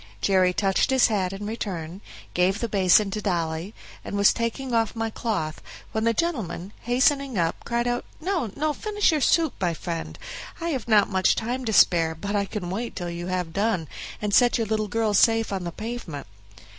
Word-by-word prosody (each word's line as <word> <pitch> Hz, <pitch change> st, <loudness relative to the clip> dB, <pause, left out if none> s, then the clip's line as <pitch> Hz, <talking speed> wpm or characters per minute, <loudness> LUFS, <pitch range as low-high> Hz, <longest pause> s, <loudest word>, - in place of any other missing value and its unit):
Jerry 185 Hz, -, +3 dB
touched 195 Hz, +1 st, +1 dB
his 265 Hz, -2 st, +4 dB
hat 190 Hz, -4 st, 0 dB
in 195 Hz, +1 st, -6 dB
return, 190 Hz, -5 st, -5 dB, 0.3 s
gave 185 Hz, +3 st, +2 dB
the 235 Hz, -, -1 dB
basin 195 Hz, 0 st, +4 dB
to 210 Hz, -, -3 dB
Dolly, 170 Hz, 0 st, -2 dB, 0.3 s
and 200 Hz, -, -4 dB
was 200 Hz, 0 st, +5 dB
taking 240 Hz, +2 st, -3 dB
off 225 Hz, -1 st, +1 dB
my 225 Hz, 0 st, -2 dB
cloth, 205 Hz, -10 st, -3 dB, 0.3 s
when 220 Hz, 0 st, -1 dB
the 230 Hz, -, +4 dB
gentleman, 220 Hz, -, -2 dB
hastening 265 Hz, +1 st, +2 dB
up, 165 Hz, -1 st, -1 dB
cried 235 Hz, 0 st, 0 dB
out, 245 Hz, 0 st, -1 dB, 0.2 s
"No, 345 Hz, -, -1 dB
no, 305 Hz, +1 st, 0 dB
finish 415 Hz, +2 st, +1 dB
your 310 Hz, -2 st, 0 dB
soup, 320 Hz, +1 st, +3 dB
my 175 Hz, -3 st, +1 dB
friend; 165 Hz, 0 st, -5 dB, 0.4 s
I 335 Hz, 0 st, -2 dB
have 265 Hz, -8 st, -3 dB
not 215 Hz, -3 st, +5 dB
much 190 Hz, -2 st, +2 dB
time 250 Hz, +3 st, -3 dB
to 225 Hz, -, 0 dB
spare, 165 Hz, -4 st, +4 dB
but 200 Hz, +5 st, -4 dB
I 200 Hz, -1 st, +1 dB
can 190 Hz, -4 st, -5 dB
wait 230 Hz, +5 st, -4 dB
till 175 Hz, -2 st, -4 dB
you 170 Hz, +1 st, -5 dB
have 180 Hz, -3 st, -2 dB
done, 200 Hz, -5 st, 0 dB, 0.3 s
and 210 Hz, -1 st, -2 dB
set 245 Hz, +2 st, +5 dB
your 230 Hz, -, 0 dB
little 215 Hz, 0 st, -1 dB
girl 220 Hz, +1 st, 0 dB
safe 225 Hz, +1 st, +3 dB
on 190 Hz, -2 st, -3 dB
the 170 Hz, -, -3 dB
pavement." 215 Hz, -8 st, -6 dB
210 Hz, 195 wpm, -25 LUFS, 180-235 Hz, 0.4 s, was